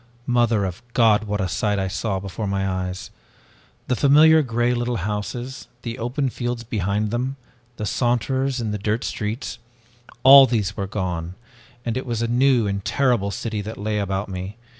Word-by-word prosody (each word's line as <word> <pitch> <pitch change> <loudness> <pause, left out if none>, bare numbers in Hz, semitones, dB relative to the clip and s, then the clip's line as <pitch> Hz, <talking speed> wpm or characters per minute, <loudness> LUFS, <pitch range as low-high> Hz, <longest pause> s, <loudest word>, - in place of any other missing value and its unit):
Mother 120 -5 +2
of 90 -2 -5
God, 110 -3 +4
what 105 0 -2
a 95 - 0
sight 105 +3 0 0.5
before 100 +2 -4
my 95 0 -1
eyes! 95 0 -4 0.8
The 125 - +1
familiar 155 +4 +6
gray 120 -2 0
little 120 0 -1
houses, 110 +6 -4 0.2
the 115 +1 -5
open 130 +4 -1
fields 120 -1 -3
behind 105 -1 -1
them, 125 +3 -2 0.4
the 105 - -3
saunterers 130 +4 0
in 110 -3 -2
the 105 - -3
dirt 110 +3 -1
streets 110 +3 -4 0.6
all 135 0 +10
these 110 -6 -1
were 100 -2 -3
gone 90 -4 -3 0.5
and 115 -1 -1
it 130 0 -4
was 115 -1 -1
a - - 0
new 125 -1 +3
and 100 -1 -2
terrible 120 -8 +1
city 110 +1 -3
that 110 +2 -7
lay 105 +1 -2
about 95 0 -2
me! 95 +2 -6
110 Hz, 165 wpm, -22 LUFS, 100-125 Hz, 0.8 s, all